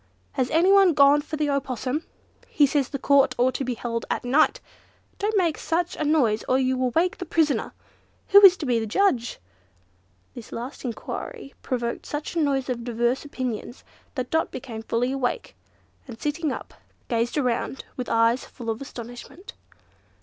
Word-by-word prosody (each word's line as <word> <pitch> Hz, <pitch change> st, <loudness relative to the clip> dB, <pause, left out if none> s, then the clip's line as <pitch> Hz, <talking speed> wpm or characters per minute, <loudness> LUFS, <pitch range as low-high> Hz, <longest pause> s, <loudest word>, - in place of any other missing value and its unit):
"Has 255 Hz, -1 st, -1 dB
anyone 370 Hz, +1 st, +5 dB
gone 285 Hz, +1 st, +6 dB
for 310 Hz, -, -6 dB
the 295 Hz, -1 st, 0 dB
opossum?" 275 Hz, +1 st, -2 dB, 0.4 s
"He 290 Hz, -, +4 dB
says 280 Hz, -2 st, 0 dB
the 280 Hz, -, -3 dB
Court 275 Hz, -1 st, +3 dB
ought 255 Hz, +1 st, +2 dB
to -, -, -2 dB
be 250 Hz, -1 st, -2 dB
held 230 Hz, 0 st, -4 dB
at -, -, -1 dB
night!" 280 Hz, +6 st, +3 dB, 0.6 s
"Don't 420 Hz, +1 st, 0 dB
make 340 Hz, -5 st, +1 dB
such 345 Hz, +1 st, -1 dB
a -, -, -2 dB
noise 270 Hz, -8 st, +2 dB
or 255 Hz, -, +4 dB
you 260 Hz, 0 st, +1 dB
will 255 Hz, 0 st, 0 dB
wake 335 Hz, +8 st, 0 dB
the -, -, -3 dB
prisoner!" 315 Hz, -3 st, +1 dB, 0.6 s
"Who 405 Hz, +1 st, +8 dB
is 380 Hz, -2 st, +9 dB
to 305 Hz, -, -4 dB
be 245 Hz, -3 st, +2 dB
the 220 Hz, -, -3 dB
judge?" 245 Hz, -, +1 dB, 1.0 s
This 240 Hz, -, -10 dB
last 245 Hz, +4 st, -6 dB
enquiry 275 Hz, -, -6 dB
provoked 240 Hz, -2 st, -3 dB
such 295 Hz, +3 st, -5 dB
a -, -, +1 dB
noise 275 Hz, -3 st, 0 dB
of 245 Hz, -2 st, -3 dB
diverse 240 Hz, +2 st, 0 dB
opinions, 255 Hz, -4 st, -5 dB, 0.3 s
that 255 Hz, -2 st, -4 dB
Dot 320 Hz, 0 st, +1 dB
became 235 Hz, -4 st, -7 dB
fully 230 Hz, +3 st, -1 dB
awake, 270 Hz, -, -2 dB, 0.5 s
and 235 Hz, -3 st, -9 dB
sitting 300 Hz, 0 st, -1 dB
up, -, -, -7 dB, 0.3 s
gazed 235 Hz, +3 st, -1 dB
around 255 Hz, -1 st, -1 dB
with 250 Hz, -, -5 dB
eyes 230 Hz, +2 st, +3 dB
full 230 Hz, -2 st, -6 dB
of 220 Hz, -, -6 dB
astonishment. 245 Hz, -, -9 dB
265 Hz, 170 wpm, -25 LUFS, 240-305 Hz, 1.0 s, is